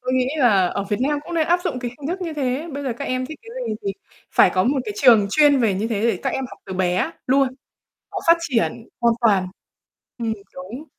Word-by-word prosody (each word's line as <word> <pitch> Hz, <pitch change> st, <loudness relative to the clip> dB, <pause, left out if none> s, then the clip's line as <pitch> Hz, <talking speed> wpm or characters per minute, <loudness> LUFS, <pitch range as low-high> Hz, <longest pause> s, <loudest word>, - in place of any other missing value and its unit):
Tôi 255 Hz, 0 st, -2 dB
nghĩ 255 Hz, 0 st, +2 dB
là 210 Hz, -10 st, +4 dB
ở 200 Hz, -, -2 dB
Việt 205 Hz, +2 st, -2 dB
Nam 290 Hz, +3 st, +1 dB
cũng 345 Hz, -, -6 dB
nên 320 Hz, -2 st, +2 dB
áp 350 Hz, +1 st, +3 dB
dụng 300 Hz, -8 st, -1 dB
cái 245 Hz, -1 st, -4 dB
hình 285 Hz, -, -4 dB
thức 365 Hz, +3 st, -3 dB
như 335 Hz, -3 st, -3 dB
thế. 280 Hz, +2 st, -2 dB
Bây 285 Hz, +1 st, -4 dB
giờ 265 Hz, -, -1 dB
các 280 Hz, -, -4 dB
em 255 Hz, -1 st, -2 dB
thích 310 Hz, -, -9 dB
cái 455 Hz, -, -12 dB, 0.2 s
gì -, -, -1 dB
thì 400 Hz, -1 st, -2 dB, 0.4 s
phải -, -, +6 dB
có 185 Hz, -, +3 dB
một 270 Hz, +2 st, +2 dB
cái -, -, -4 dB
trường 230 Hz, -, +6 dB
chuyên 290 Hz, 0 st, +5 dB
về 220 Hz, -5 st, +2 dB
như 210 Hz, +4 st, -2 dB
thế 215 Hz, -3 st, -1 dB
để 225 Hz, -5 st, +2 dB
các -, -, 0 dB
em 265 Hz, -, -2 dB
học -, -, -12 dB
từ 190 Hz, -, -6 dB
bé 185 Hz, -, 0 dB, 0.2 s
luôn, 270 Hz, +1 st, +3 dB, 0.6 s
nó -, -, -3 dB
phát 335 Hz, 0 st, +7 dB
triển 240 Hz, -6 st, -1 dB
hoàn 235 Hz, -1 st, +4 dB
toàn. 200 Hz, -5 st, +3 dB, 0.7 s
Ừm, 230 Hz, -2 st, -1 dB, 0.2 s
đúng. 200 Hz, +10 st, -8 dB
255 Hz, 250 wpm, -22 LUFS, 220-295 Hz, 0.7 s, phát